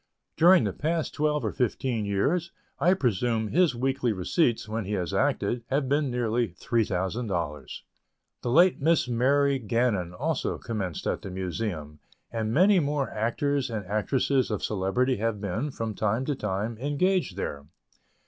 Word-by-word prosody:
During 175 +2 +6
the - - -1
past 160 +1 -1
twelve 150 -3 0
or 110 - 0
fifteen 125 -2 -1
years, 150 - 0 0.3
I 180 +2 +4
presume 115 - 0
his 170 - +3
weekly 130 0 0
receipts, 110 - +1
when 110 -1 -3
he 105 - -3
has 90 -5 -2
acted, 120 -1 0
have 135 0 0
been 145 +1 +1
nearly 120 -1 0
$3,000. 95 - -2 0.6
The - - -3
late 175 +7 +5
Miss 160 -2 +3
Mary 135 +3 +2
Gannon 115 -6 0
also 90 - -2
commenced 95 -8 -4
at - - -1
the - - -7
Museum, 90 -4 -4 0.3
and 110 -2 -2
many 185 - +5
more 145 -3 -1
actors 130 +5 0
and 110 -4 -4
actresses 125 +6 +1
of 105 -3 -3
celebrity 110 +6 0
have 110 0 -1
been, 105 +8 -2
from 115 -5 -4
time 110 +5 0
to 145 - 0
time, 105 +1 -3
engaged 145 - 0
there. 70 -7 -4
120 Hz, 150 wpm, -27 LUFS, 100-140 Hz, 0.6 s, During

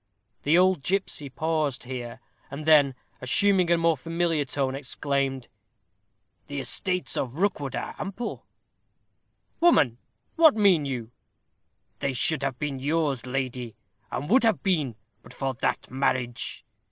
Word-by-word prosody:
The 155 +4 +4
old 185 -3 +4
gipsy 165 -3 -1
paused 155 0 -1
here, 125 -1 -6 0.3
and 140 +2 -7
then, 145 -4 +5 0.3
assuming 185 +7 +3
a 170 - +5
more 165 -1 +3
familiar 165 +1 0
tone, 135 0 -1
exclaimed, 135 -1 -2 1.0
"The 140 -1 -4
estates 180 +2 -1
of 125 -1 -2
Rookwood 150 - -1
are - - -4
ample 200 +5 -5 0.6
" - - -48
"Woman, 140 - +4 0.4
what 320 -5 +7
mean 195 -8 +4
you?" 120 -4 -4 0.9
"They 135 +1 -1
should 150 +4 +1
have 135 -2 -2
been 140 -2 -3
yours, 145 -3 0
lady, 125 -3 -3 0.3
and 145 - -4
would 260 +3 +6
have 225 -2 +2
been, 155 - +1 0.3
but - - -15
for 135 -1 -2
that 120 - -2
marriage. 130 -2 -1
140 Hz, 135 wpm, -26 LUFS, 130-170 Hz, 1.0 s, what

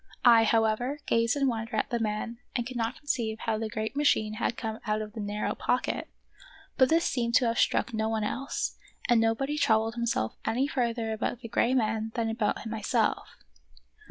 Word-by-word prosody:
I, 230 -2 +7
however, 225 +5 +1
gazed 230 +2 +2
in 280 -1 +2
wonder 225 -2 -2
at 215 - -1
the 235 - 0
man 225 +2 -2 0.2
and 240 - 0
could 255 +1 -7
not 230 +2 -1
conceive 240 -8 -2
how 220 -2 -1
the 220 -1 -3
great 220 +2 -3
machine 250 -7 +2
had 235 - 0
come 220 -2 -4
out 215 0 +1
of 215 -1 -6
the 225 - -7
narrow 205 0 -2
pocket; 250 - -1 0.7
but 260 -1 +4
this 330 +1 +3
seemed 235 -2 0
to 250 - +5
have 230 0 0
struck 255 - +2
no 220 0 0
one 220 -1 -1
else, 265 +6 -3 0.3
and 240 -2 +4
nobody 270 +7 0
troubled 220 -2 +3
himself 235 - -1
any 250 +4 +1
further 235 -4 -1
about 225 +2 -3
the 230 - -6
gray 235 +3 +2
man 220 -2 0
than 225 -2 0
about 225 -1 -1
myself. 220 -1 0
230 Hz, 190 wpm, -28 LUFS, 220-245 Hz, 0.7 s, I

